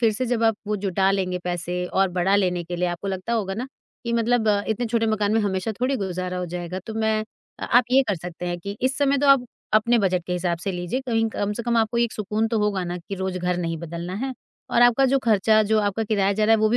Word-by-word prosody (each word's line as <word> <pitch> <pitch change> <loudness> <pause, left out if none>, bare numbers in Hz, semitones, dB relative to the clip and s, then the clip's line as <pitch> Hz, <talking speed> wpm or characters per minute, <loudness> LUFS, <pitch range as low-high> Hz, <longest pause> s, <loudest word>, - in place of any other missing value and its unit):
फिर 225 -2 +3
से 255 +4 -2
जब 235 -1 0
आप 225 0 +4
वो 210 0 0
जुटा 195 -1 +1
लेंगे 185 -2 -1
पैसे 175 0 -2
और 190 +1 +1
बड़ा 180 +2 +1
लेने 180 -3 +1
के 175 +1 -5
लिए 180 +1 0
आपको 175 +3 -4
लगता 190 +4 -3
होगा 200 -4 -1
ना, 240 +5 -4 0.4
कि 235 - -2
मतलब 235 -1 +2 0.2
इतने 230 +2 -1
छोटे 225 0 +1
मकान 210 -1 +1
में 225 - +3
हमेशा 195 +1 -1
थोड़ी 265 +2 +1
गुज़ारा 185 -3 -3
हो 180 - -3
जाएगा 175 +1 -5
तो 220 - -6
मैं 220 -1 0 0.4
आप 245 +1 +5
ये 270 +1 +6
कर 205 - +2
सकते 175 +1 -7
हैं 175 0 -2
कि 200 +3 -6
इस 260 +2 +1
समय 280 -1 +3
तो 285 - +1
आप 275 -3 +6 0.3
अपने 235 +2 +4
बजट 185 -4 +1
के 180 - -3
हिसाब 175 -1 -1
से 195 +3 -3
लीजिए, 180 +8 -3
कहीं 225 -4 0
कम 205 -1 -2
से 235 +3 -4
कम 235 0 0
आपको 225 +1 +1
एक 235 -1 +1
सुकून 215 +1 -1
तो 225 -1 0
होगा 205 -3 0
ना 175 0 -4
कि 175 +3 -7
रोज़ 190 -1 -3
घर 180 0 -1
नहीं 165 -2 -2
बदलना 170 +2 -6
है 260 +6 -3 0.4
और 240 - +4
आपका 245 +2 +5
जो 270 +1 +3
खर्चा, 215 0 +4
जो 215 +1 +2
आपका 205 +2 -1
किराया 200 -2 +1
जा 215 +2 +1
रहा 225 +1 +5
है 215 - -2
वे 215 - +5
205 Hz, 260 wpm, -23 LUFS, 180-225 Hz, 0.4 s, ये